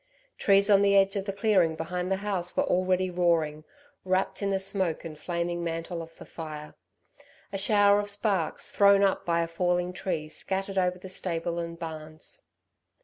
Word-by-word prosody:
Trees 200 0 +4
on 200 -2 +5
the 200 0 +4
edge 195 0 +3
of 195 -1 -2
the 200 - -2
clearing 195 -5 +2
behind 180 +3 -3
the - - +3
house 180 -4 -1
were - - +4
already 185 0 +1
roaring, 165 -4 +1 0.4
wrapped 185 +2 0
in 200 - 0
the 195 - +1
smoke 190 -4 -1
and 160 -2 -6
flaming 170 +2 -3
mantle 165 +1 -4
of 165 0 -11
the - - -11
fire. 155 -2 -8 0.8
A 195 - -2
shower 205 0 +5
of 205 0 -2
sparks 200 -4 0
thrown 200 0 +5
up 195 -2 +1
by 170 0 +2
a - - -3
falling 175 +1 0
tree 170 -4 -3
scattered 195 +4 -2
over 180 -1 +1
the 185 - -10
stable 170 -2 -2
and 170 0 -5
barns. 160 - -7
180 Hz, 180 wpm, -27 LUFS, 165-195 Hz, 0.8 s, on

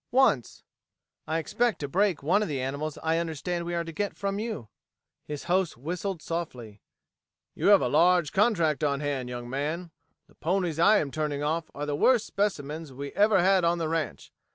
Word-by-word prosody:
"Once. 240 - +2 0.6
I 160 +1 0
expect 230 +8 0
to 145 - -4
break 185 0 +1
one 170 +8 +3
of 215 - 0
the 145 -4 -2
animals 140 +4 -3
I 160 +1 +2
understand 170 +1 -3
we 175 0 -3
are 170 - 0
to 165 - -7
get 205 +4 -3
from 200 0 -2
you." 215 - -4 0.6
His 150 -1 -5
host 180 -3 0
whistled 175 +5 -4
softly. 125 -11 -5 0.7
"You - - -1
have 205 -1 +7
a - - +2
large 175 -3 +4
contract 170 - +2
on 140 -2 +1
hand, 140 -4 -2
young 120 -1 -6
man. 155 +7 -3 0.3
The - - -25
ponies 175 -1 -1
I 210 +5 +6
am 145 -7 -1
turning 150 -1 -2
off 160 +2 -1
are 145 - -3
the 145 -1 -1
worst 235 - +4
specimens 160 -6 -2
we 140 +2 -6
ever 205 -3 +4
had 190 -1 +4
on 170 +1 +2
the 165 -2 -2
ranch. 165 -1 -3
165 Hz, 190 wpm, -27 LUFS, 145-190 Hz, 0.7 s, have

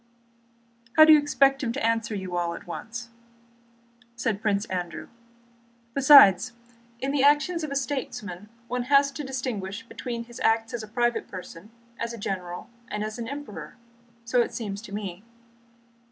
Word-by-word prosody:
"How 310 - +10
do 315 - +9
you 305 - +8
expect 275 -1 +3
him 240 -4 -1
to 260 -3 -2
answer 230 -1 0
you 190 -2 -5
all 170 -1 -1
at - - -10
once?" 230 +7 -7 1.1
said 225 -3 -1
Prince 205 -1 +1
Andrew. 175 -4 -5 0.8
"Besides, 250 -6 +7 0.5
in 270 +2 -1
the 285 -1 +1
actions 295 +4 +3
of 305 - -3
a 280 - -4
statesman 245 -8 -4 0.2
one 245 0 -2
has 280 0 +5
to 295 +2 -6
distinguish 250 -6 -4
between 235 -1 -5
his 240 0 -12
acts 225 +1 +1
as 240 - -3
a 215 - -8
private 240 +1 0
person, 185 +1 -10 0.3
as 235 0 -3
a - - -7
general, 180 -4 -5 0.2
and 210 -4 -3
as 215 +2 -5
an 230 - -4
emperor. 220 - -7 0.5
So 245 +1 +3
it - - -2
seems 205 -3 -4
to 220 - -11
me." 200 -2 -5
230 Hz, 165 wpm, -26 LUFS, 200-270 Hz, 1.1 s, How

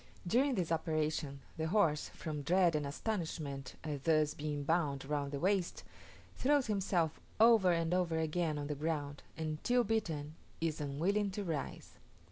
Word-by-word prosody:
During 255 +8 +3
this 175 -5 -1
operation, 155 -3 -1 0.2
the 160 0 -1
horse, 165 -5 +2
from 150 -2 -4
dread 175 +3 +3
and 150 -2 0
astonishment 150 -6 -3
at 150 -3 -4
thus 155 -2 +3
being 145 -1 -3
bound 145 -4 0
round 145 -1 -1
the 140 - -3
waist, 185 +1 0 0.5
throws 285 0 +3
himself 190 -6 0 0.2
over 220 -5 +6
and 165 0 +1
over 175 -3 +1
again 160 -1 0
on 145 - -3
the 150 - -2
ground, 145 -1 -3 0.2
and, 155 -1 -3
till 245 0 +3
beaten, 165 -10 -1 0.3
is 160 -2 -1
unwilling 180 +9 0
to 200 +2 -4
rise. 160 -6 -5
160 Hz, 155 wpm, -34 LUFS, 150-185 Hz, 0.5 s, over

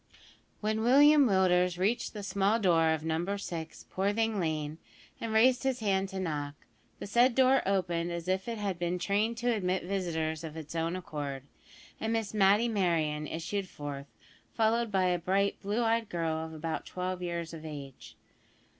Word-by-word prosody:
When 215 +1 0
William 285 +4 +6
Willders 180 -3 +3
reached 205 +6 0
the 210 -2 -6
small 200 +2 +1
door 170 -6 +3
of 160 -1 -1
Number 170 +5 -1
6, 165 -5 -6
Poorthing 205 +2 0
Lane, 155 -2 -2 0.4
and 230 - -4
raised 245 +3 +4
his 265 -2 0
hand 195 -3 0
to 190 -1 -5
knock, 150 -5 -3 0.4
the - - -7
said 240 +4 +3
door 265 0 +5
opened 175 -3 0
as 170 0 -5
if 190 +2 -1
it 230 -1 -3
had 200 -4 -3
been 175 +1 -1
trained 205 +5 0
to 240 0 +1
admit 185 -3 -1
visitors 165 -4 -2
of 160 -1 -7
its 155 -1 -7
own 165 +1 -1
accord, 145 -7 -5 0.6
and 220 - -2
Miss 225 -3 -2
Matty 205 +3 +4
Merryon 165 -8 0
issued 185 +5 -3
forth, 145 -1 -7 0.5
followed 230 0 +2
by 190 -2 +2
a 180 -1 +1
bright 195 +3 0
blue 210 +4 -1
eyed 225 -1 +1
girl 165 -2 -1
of - - -11
about 160 0 -4
twelve 180 0 -4
years 170 -2 -4
of 160 -1 -8
age. 140 -4 -9
185 Hz, 170 wpm, -30 LUFS, 165-215 Hz, 0.6 s, William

